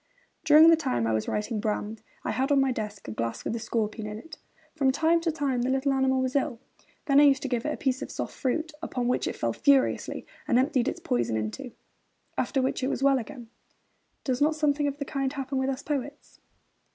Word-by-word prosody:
During 315 +1 +8
the - - +7
time 260 - -1
I 115 - +1
was 110 0 -1
writing 210 +1 -2
Brand, 210 0 -3 0.2
I - - -1
had 265 +3 0
on 280 - +5
my 270 -1 +2
desk 210 -4 -5
a - - -4
glass 115 +1 -4
with - - -1
a - - -3
scorpion 215 -1 -2
in 210 0 -6
it. 315 +7 -12 0.4
From 275 -4 +3
time 325 +4 +2
to 330 -1 0
time 280 -5 -1
the 250 - 0
little 270 +1 +1
animal 265 0 +2
was 255 +1 -2
ill. 255 -4 0 0.5
Then 280 -1 +5
I - - +7
used 275 -2 +4
to - - -1
give 245 0 -1
it - - 0
a - - -4
piece 260 -2 -1
of - - -5
soft - - -5
fruit, 315 +5 -2
upon 245 -1 -2
which 250 - 0
it - - -3
fell - - -1
furiously 275 -2 +2 0.2
and 245 -5 +3
emptied 260 -1 +2
its - - -2
poison 120 -2 0
into 110 0 -4
it 245 - -15 0.6
after 270 -3 0
which 260 - -1
it 260 - 0
was 270 - -2
well 275 -1 +4
again. 235 0 -9 0.7
Does 260 -1 -1
not 310 +2 +3
something 295 -1 +1
of 285 0 -3
the 285 - -4
kind 275 -1 -2
happen 270 -1 -3
with 265 0 0
us 270 0 -3
poets? 285 0 -5
265 Hz, 235 wpm, -27 LUFS, 230-285 Hz, 0.7 s, During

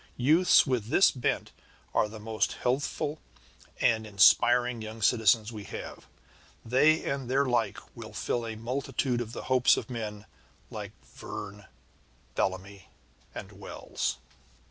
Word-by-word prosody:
Youths 155 +9 +5
with 125 -6 -1
this 190 - +5
bent 125 - -2 0.4
are 105 - +2
the 110 0 -9
most 110 0 -1
healthful 145 +4 -2 0.6
and 110 -1 +2
inspiring 120 +4 +4
young 110 +1 -7
citizens 110 0 +3
we 105 -3 -8
have. - - -8 0.6
They 150 +7 +3
and 135 -3 -3
their 135 +2 +2
like 120 -3 0 0.2
will - - -9
fulfil 120 -1 -2
a 110 - -5
multitude 125 +1 -2
of 115 -1 -6
the - - -6
hopes 130 -1 +4
of - - -5
men 105 -3 -5 0.5
like - - -7
Verne, 100 0 -9 0.7
Bellamy, 95 0 -3 0.5
and - - -7
Wells. - - -4
120 Hz, 130 wpm, -28 LUFS, 110-130 Hz, 0.7 s, Youths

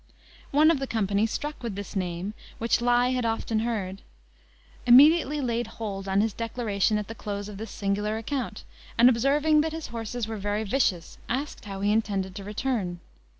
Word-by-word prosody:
One 305 +3 +5
of 310 - 0
the 270 - -3
company, 210 -1 +1
struck 295 +6 -4
with 230 -5 -4
this 200 +1 -7
name, 180 +1 -2 0.2
which 230 +1 +2
he 240 - -4
had 245 +1 +3
often 225 -1 0
heard, 205 -4 -2 0.9
immediately 295 +3 +7
laid 240 -2 -1
hold 200 -3 -4
on 195 +1 +3
his 220 -1 0
declaration 220 -2 0
at 210 -1 -3
the 225 - -6
close 205 -2 -5
of 210 -2 -8
this 220 0 -6
singular 205 +2 -1
account, 230 -1 -4 0.3
and, 240 +2 +8
observing 290 +5 +3
that 315 +1 -2
his 320 -1 -5
horses 230 0 -4
were 220 0 -4
very 205 +2 -1
vicious, 200 -7 0
asked 275 0 -3
how 195 -1 -6
he 205 +1 +2
intended 200 -4 0
to 200 +1 -7
return. 210 -4 -2
225 Hz, 180 wpm, -27 LUFS, 200-250 Hz, 0.9 s, and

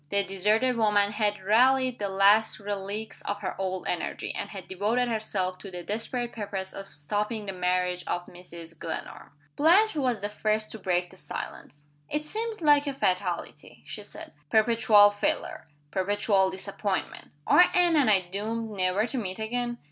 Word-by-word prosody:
The 200 +3 +1
deserted 210 +6 +1
woman 205 -2 +3
had 210 -2 -1
rallied 255 +4 +3
the 200 -1 -2
last 200 +4 +4
relics 205 +1 -5
of 205 0 -4
her 190 - -3
old 185 -1 -3
energy 175 - -3
and - - -5
had 195 -3 -9
devoted 215 +6 0
herself 195 -5 -2
to 195 - -9
the 180 -1 -7
desperate 235 +4 -3
purpose 200 -3 -5
of 195 0 -9
stopping 205 +9 -3
the 195 - -4
marriage 180 0 0
of 175 0 -2
Mrs. 170 -2 -12
Glenarm. 160 - -6 0.3
Blanche 370 +8 +4
was 250 -7 0
the 205 - -1
first 215 +1 -1
to 220 - -7
break 180 -2 0
the - - -16
silence. 145 +2 -8 0.2
"It 300 +1 -2
seems 440 +4 -4
like 295 -2 +5
a 275 - -2
fatality," 180 - -2
she - - -7
said. 205 - -10 0.2
"Perpetual 215 -1 +5
failure! 205 - -2 0.3
Perpetual 195 +1 +2
disappointment! 195 +1 -4 0.2
Are 355 - +7
Anne 350 -2 +4
and 280 -6 +4
I 195 -3 +5
doomed 215 +5 -4
never 190 +1 +1
to 245 +2 -3
meet 185 -4 -4
again?" 240 +2 -2
205 Hz, 165 wpm, -27 LUFS, 190-230 Hz, 0.3 s, Are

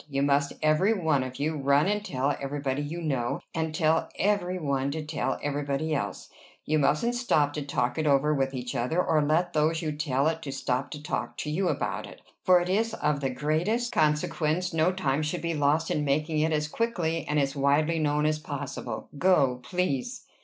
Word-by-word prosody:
"You 140 -1 0
must, 140 0 +2
every 155 +8 +4
one 160 -8 +1
of 130 0 -5
you, 155 +3 -1
run 140 +1 +3
and 210 +1 0
tell 140 -6 -1
everybody 140 0 -2
you 165 +4 -5
know, 130 -6 -1
and 160 -1 -1
tell 160 -1 +2
every 190 -2 +1
one 140 -4 -1
to 155 +1 -4
tell - - -2
everybody 145 +2 -1
else. 140 - -3 0.4
You 155 0 +2
mustn't 150 +12 +2
stop 155 - +1
to 150 - -3
talk 125 -2 -1
it 155 - 0
over 145 +2 +3
with 135 -1 0
each 125 -1 -4
other, 125 +9 0
or 160 -3 +3
let 160 +4 +1
those 160 +2 +1
you 155 - -1
tell 145 -2 0
it 160 0 -1
to 140 - -5
stop 130 0 -2
to 150 -1 -8
talk - - -3
to 150 - -3
you 185 +4 0
about - - -2
it; - - -13 0.2
for 185 -2 +6
it 175 - -2
is 220 +4 +1
of 150 -1 0
the 135 -2 -1
greatest 170 - 0
consequence 155 +3 +1
no 165 +2 +3
time 150 -6 0
should 155 +3 -3
be 170 0 -1
lost 150 +2 +1
in 150 - 0
making 150 +2 0
it 160 +1 +2
as 150 -1 0
quickly 165 -5 -1
and 150 0 +1
as 140 0 0
widely 150 +4 +2
known 150 0 +1
as 155 0 +1
possible. 140 -6 -5
Go, 140 -9 +3
please." 180 - -2
150 Hz, 205 wpm, -27 LUFS, 140-165 Hz, 0.4 s, for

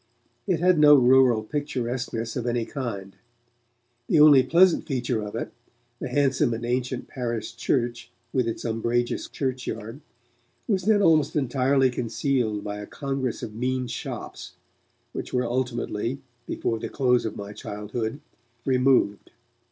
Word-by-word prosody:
It 180 -5 +1
had 180 -1 +4
no 150 -1 +8
rural 125 -3 +5
picturesqueness 125 -3 -3
of 125 -1 -3
any 120 -1 0
kind. 100 -9 -5 0.9
The 160 - +3
only 150 -3 +8
pleasant 170 +7 +4
feature 125 -5 -1
of 105 +1 -6
it, 115 - -4 0.5
the - - -4
handsome 130 -3 +2
and 115 +1 -5
ancient 125 +1 -2
parish 120 -4 -4
church 120 -1 -1 0.2
with 125 -3 +1
its 115 - -4
umbrageous 115 +1 -1
churchyard, 130 -2 -4 0.7
was 190 -5 0
then 210 -1 +4
almost 155 -4 +3
entirely 135 -1 +2
concealed 120 -3 -1
by 105 0 -5
a 105 - -7
congress 135 -4 -3
of 110 - -6
mean 125 +3 -1
shops, 90 -6 -7 0.6
which - - -6
were 125 -1 +1
ultimately, 120 -1 -2 0.3
before 115 -1 -2
the - - -5
close 125 -3 +2
of 110 - -4
my 100 0 -7
childhood, 110 +6 -5 0.4
removed. 130 -5 +2
125 Hz, 135 wpm, -25 LUFS, 115-135 Hz, 0.9 s, no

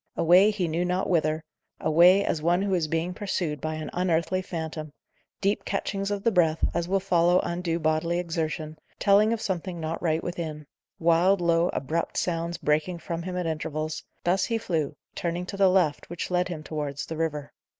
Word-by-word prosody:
Away, 180 +5 +6
he 200 -5 -1
knew 165 +2 0
not 180 +1 0
whither 155 -2 +1 0.4
away, 180 +5 +5
as 155 - -1
one 175 +4 +2
who 200 -1 0
is 170 -4 +1
being 165 +3 -1
pursued 180 -7 -2
by 155 0 -2
an 155 0 -5
unearthly 180 +1 +1
phantom 160 -4 -5 0.5
deep 200 +1 +1
catchings 195 0 -2
of 205 -1 -2
the 230 - +3
breath, 165 -5 +3
as 170 0 -1
will 195 +2 +2
follow 180 -1 +3
undue 170 -1 -2
bodily 160 +1 0
exertion, 160 -2 -3 0.2
telling 205 +2 +4
of 230 - 0
something 185 -3 -3
not 160 +1 -3
right 160 -2 0
within; 160 -4 -5 0.3
wild, 170 +4 +3
low, 170 0 +2
abrupt 160 +5 -2
sounds 170 0 -1
breaking 155 +4 0
from 170 0 -5
him 180 +1 -4
at 180 - -1
intervals 155 -1 -3 0.2
thus 180 +3 +2
he 230 - 0
flew, 160 -9 -2 0.2
turning 175 +1 -3
to 195 - -6
the 195 -1 +5
left, 180 -6 +1
which 175 +1 -5
led 180 0 +2
him 165 -4 -6
towards 145 -3 -4
the 165 - -6
river. 150 -3 -3
170 Hz, 185 wpm, -26 LUFS, 155-185 Hz, 0.5 s, Away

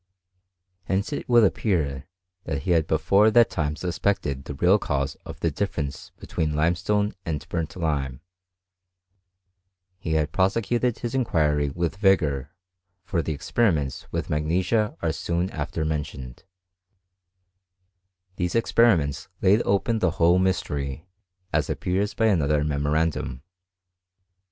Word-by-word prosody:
Hence 100 +9 -1
it 145 - -5
would 120 -2 +6
ar, 80 - 0 0.4
that 70 -3 -3
he 90 - -1
had 80 -2 +3
before 95 +8 +4
that 120 +1 +5
time 75 -1 -1
suspected 85 -6 -2
the 70 - -6
real 90 +8 +4
5 70 -5 -2
•of - - -8
the 85 - +1
difference 75 -5 -3
between 75 -2 -2
limestone 90 +7 +1
and 75 -5 -4
burnt 80 -1 -3 2.2
He 80 -3 -3
had 80 -1 +1
prosecuted 115 +5 +1
his 120 0 -4
inquiry 75 - +1
with 85 +4 -2
vigour; 75 -9 +2 0.5
for 85 -2 -1
the 80 -2 -3 0.2
riments 75 - +1
with - - -2
magnesia 90 +8 0
are 80 - +2
soon 85 +3 -2
after 75 +1 -3
mentioned, 70 -5 -5 1.9
lese 90 +2 -1
experiments 100 -12 +2
laid 100 +4 +4
open 110 +3 +1
the - - +2
whole 85 +2 +4
mystery, 75 -6 -1 0.5
as - - +1
dLTS 95 +3 -1
by 115 - +1
another 75 -8 +2
memorandum. 75 -2 -1
85 Hz, 120 wpm, -25 LUFS, 75-100 Hz, 2.2 s, would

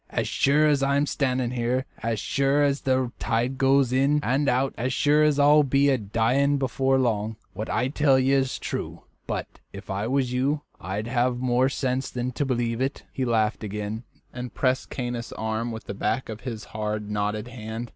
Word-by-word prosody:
"As - - -1
sure 145 +3 +3
as 145 -2 +3
I 140 0 +2
am 145 - +2
standing 130 -4 0
here, 125 +1 0 0.2
as 115 -1 -1
sure 140 +5 +2
as 140 -1 +1
the 130 -2 +1
tide 125 +4 -1
goes 135 -1 +3
in 140 +3 +3
and 140 +3 +1
out, 130 +1 +1
as 125 +3 -2
sure 150 +2 +3
as 150 -2 +3
I'll 145 +1 +6
be 140 0 +3
a 135 - +3
dying 120 +7 +1
before 135 0 +1
long, 110 -4 0 0.2
what 110 +3 -5
I 125 - +1
tell 140 -1 +3
you 130 +1 +3
is 130 -1 0
true; - - -5 0.2
but - - -4
if - - -8
I 100 +3 -2
was 130 -1 0
you, 140 +4 +1 0.2
I'd 95 +4 -4
have 120 +1 +1
more 125 +1 +2
sense 130 -1 -1
than 125 +1 -3
to 145 +3 -2
believe 120 -2 -1
it." 135 +2 -2
He 130 - -1
laughed 110 -2 +1
again, 105 +1 -4 0.3
and 125 0 -6
pressed 130 -1 0
Caius' 120 -2 -4
arm 110 +2 -2
with 110 0 -6
the - - -6
back 110 +5 -2
of 110 0 -6
his 115 -5 -5
hard, 105 -1 -3
knotted 105 +2 -2
hand. 115 0 -6
125 Hz, 195 wpm, -25 LUFS, 115-135 Hz, 0.3 s, I'll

